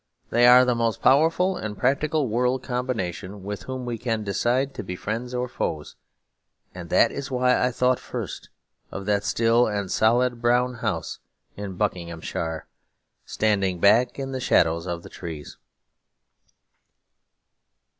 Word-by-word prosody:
They 120 +1 +5
are 125 +1 +8
the 125 - +2
most 115 -3 -1
powerful 165 +7 +4
and 110 - -5
practical 140 +4 +1
world 125 +3 0
combination 105 -7 -4
with 100 0 -5
whom 130 -1 -5
we 120 -2 -4
can 115 -3 -2
decide 125 +7 0
to - - -6
be 90 -1 -5
friends 115 +6 -4
or 125 0 -1
foes; 75 -10 -4 0.8
and - - -9
that - - +4
is 140 +1 -5
why 125 -1 +2
I 125 - +3
thought 125 +1 +1
first - - -6 0.4
of 100 - -7
that 100 0 +1
still 115 +2 +3
and 100 -3 -3
solid 120 +2 +2
brown 125 +1 +2
house 100 -8 -3 0.4
in 100 -2 -6
Buckinghamshire, 85 -4 -3 0.6
standing 100 -4 0
back 110 +7 +4
in 135 -1 -4
the 130 - -3
shadow 80 -8 +3
of 85 0 -5
the - - -11
trees. 80 -4 -8
115 Hz, 145 wpm, -24 LUFS, 100-125 Hz, 0.8 s, are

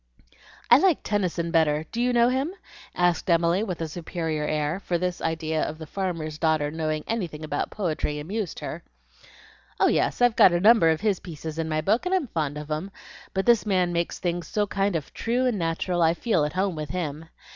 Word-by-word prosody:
"I 240 - +9
like 365 -2 +3
Tennyson 180 -5 -1
better. 155 -2 +2
Do 235 - -2
you 250 +1 +2
know 240 0 +4
him?" 270 +8 -1 0.4
asked 175 0 +1
Emily, 170 +2 +3
with 185 -6 -4
a 165 - -1
superior 160 -1 -3
air, 155 +3 -1
for 175 -3 -1
the 180 +1 -1
idea 160 -1 -1
of 155 - -3
this 160 -2 -9
farmer's 165 -6 -3
daughter 155 -2 +1
knowing 155 -1 -2
anything 175 -9 -3
about 150 -1 -2
poetry 155 -6 -2
amused 190 +4 -4
her. - - -5 1.0
"Oh - - +4
yes, - - +1
I've 245 -2 +4
got 180 - +7
a 175 - +2
number 210 -3 +6
of 160 +1 +1
his 205 -4 +1
pieces 160 -2 -7
in 160 -1 -2
my 155 0 0
book, 220 - +1
and 375 - +2
I'm 365 -6 +1
fond 150 -5 -2
of 150 +1 -7
'em. 155 +6 -2 0.5
But 190 - 0
this 235 -2 +5
man 185 -4 +1
makes 170 0 -1
things 175 -1 -2
so 210 -1 0
kind 195 -1 -1
of 155 -3 -4
true 245 +3 0
and 240 -6 0
natural 170 +1 -1
I 165 0 +4
feel 175 -7 +1
at 150 - -4
home 190 -1 0
with 150 -2 -5
HIM. 160 -3 -4
170 Hz, 210 wpm, -25 LUFS, 155-205 Hz, 1.0 s, I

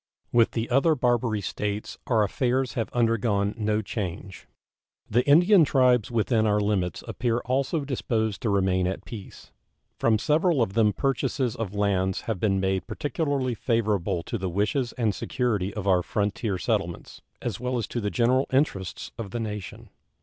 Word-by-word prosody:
With 115 -1 +3
the 115 0 -1
other 145 +5 +4
Barbary 120 -4 +1
States 105 +2 -4
our 115 -5 +3
affairs 125 +5 0
have 115 -3 -2
undergone 115 -4 +1
no 110 -1 0
change. 95 -2 -6 0.6
The 120 +4 +2
Indian 175 +5 +6
tribes 125 -5 +3
within 115 -1 +1
our 105 0 +2
limits 100 -5 -1
appear 120 -2 -1
also 135 +5 0
disposed 110 -6 -1
to 115 - 0
remain 95 -2 +2
at 95 +1 -4
peace. 100 +1 -10 0.5
From 115 -1 +3
several 155 - +2
of 95 - -3
them 110 -1 +4
purchases 135 -1 -1
of 105 -3 -4
lands 95 -2 +1
have 110 -5 -3
been 95 -1 +1
made 95 0 -1
particularly 145 -3 -1
favorable 105 -6 0
to - - -4
the 95 0 -2
wishes 105 +7 0
and 115 -5 0
security 105 -5 -1
of 100 -1 -5
our 90 -2 +4
frontier 100 +1 -1
settlements, - - -3 0.2
as 115 -6 -4
well 125 +1 -2
as 115 - -1
to 120 - -3
the 105 - -1
general 125 +4 +2
interests 130 - -1
of 110 -4 -4
the 120 - -4
nation. 105 -7 -6
110 Hz, 165 wpm, -26 LUFS, 100-125 Hz, 0.6 s, Indian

